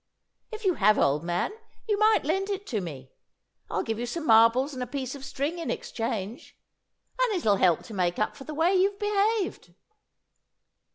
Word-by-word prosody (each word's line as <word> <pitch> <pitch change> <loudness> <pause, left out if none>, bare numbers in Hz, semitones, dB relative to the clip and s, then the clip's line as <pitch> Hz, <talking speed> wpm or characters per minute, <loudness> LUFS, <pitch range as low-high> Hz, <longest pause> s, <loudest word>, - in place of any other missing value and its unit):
If 435 -1 -7
you 370 - +4
have, 210 -5 +3
old 145 +3 +2
man, 175 - -1 0.4
you 415 -2 +1
might 430 -4 +4
lend 385 +6 0
it 395 0 -3
to 220 - -2
me. 135 -7 -8 0.6
I'll - - -1
give 225 -1 -3
you 240 - -3
some 320 +6 -4
marbles 230 +4 +5
and 255 - -6
a 250 - -3
piece 265 0 -4
of 280 -2 -9
string 285 +5 -3
in 335 - -4
exchange, 225 - -4 0.6
and 480 -4 +2
it'll 215 - +2
help 175 -4 +3
to 225 - -11
make 180 -3 0
up 215 - -1
for 270 - -10
the 305 - -6
way 330 +5 +3
you've 390 +2 +2
behaved!" 415 - -1
270 Hz, 185 wpm, -27 LUFS, -, 0.6 s, marbles